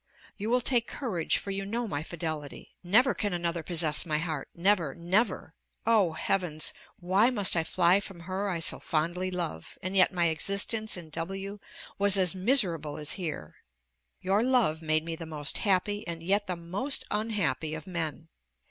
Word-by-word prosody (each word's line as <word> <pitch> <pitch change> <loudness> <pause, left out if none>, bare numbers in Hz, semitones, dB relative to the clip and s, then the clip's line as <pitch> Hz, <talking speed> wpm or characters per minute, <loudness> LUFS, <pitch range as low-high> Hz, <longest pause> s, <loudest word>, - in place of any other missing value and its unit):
You 210 +2 -4
will 250 +1 +3
take 240 -1 +2
courage, 185 - -1
for 200 - -5
you 195 0 -2
know 230 +4 -3
my 145 -7 -3
fidelity. 155 -3 -6
Never 235 +9 +4
can 205 -3 -2
another 170 -1 -1
possess 160 -2 +2
my 155 -3 0
heart 155 -3 -4
never, 170 -5 +1
never! 185 +1 0 0.3
Oh, 215 -7 +3
heavens! 160 -1 -1 0.3
Why 190 +6 +3
must 205 -8 +3
I 165 - +2
fly 175 +2 +3
from 195 -3 -8
her 190 +3 -3
I 170 -3 -2
so - - 0
fondly 175 +4 -1
love? 175 - -5
and 185 +2 -4
yet 185 -1 +6
my 175 -2 +1
existence 200 +6 0
in 165 -3 -9
W 195 +5 -5 0.4
was 200 0 +6
as 185 -2 +3
miserable 185 - +3
as 150 0 -2
here. 155 - -4 0.6
Your 195 +3 +2
love 235 -11 +2
made 155 0 0
me 165 -1 -4
the 165 0 -8
most 150 -2 -1
happy 205 +1 0
and 165 -1 -5
yet 200 +4 +1
the 180 - -2
most 200 +11 -1
unhappy 210 -7 -1
of 155 - -8
men. 165 -3 -4
180 Hz, 175 wpm, -28 LUFS, 160-205 Hz, 0.6 s, yet